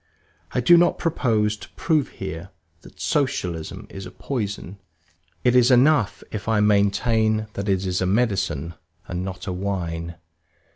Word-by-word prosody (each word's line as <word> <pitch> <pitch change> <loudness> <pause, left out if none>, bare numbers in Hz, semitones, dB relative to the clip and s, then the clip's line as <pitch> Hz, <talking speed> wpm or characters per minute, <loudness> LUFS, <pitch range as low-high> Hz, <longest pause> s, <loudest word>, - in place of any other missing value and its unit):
I 125 - +1
do 170 +8 +7
not 175 0 +3
propose 110 -10 +1
to - - -12
prove 155 -5 +1
here 95 -1 -7 0.3
that - - -16
Socialism 90 - -2
is 95 -1 -7
a - - -8
poison; 100 -6 -4 0.6
it 125 0 +3
is 125 0 +6
enough 125 -3 +4
if 105 -1 -5
I 110 -1 +2
maintain 110 +2 +2
that 100 +1 -3
it 95 0 +1
is 90 0 -1
a 90 - +1
medicine 95 - 0 0.3
and 90 0 -3
not 95 +1 -6
a 95 - -3
wine. 85 -3 -3
100 Hz, 150 wpm, -23 LUFS, 95-120 Hz, 0.6 s, do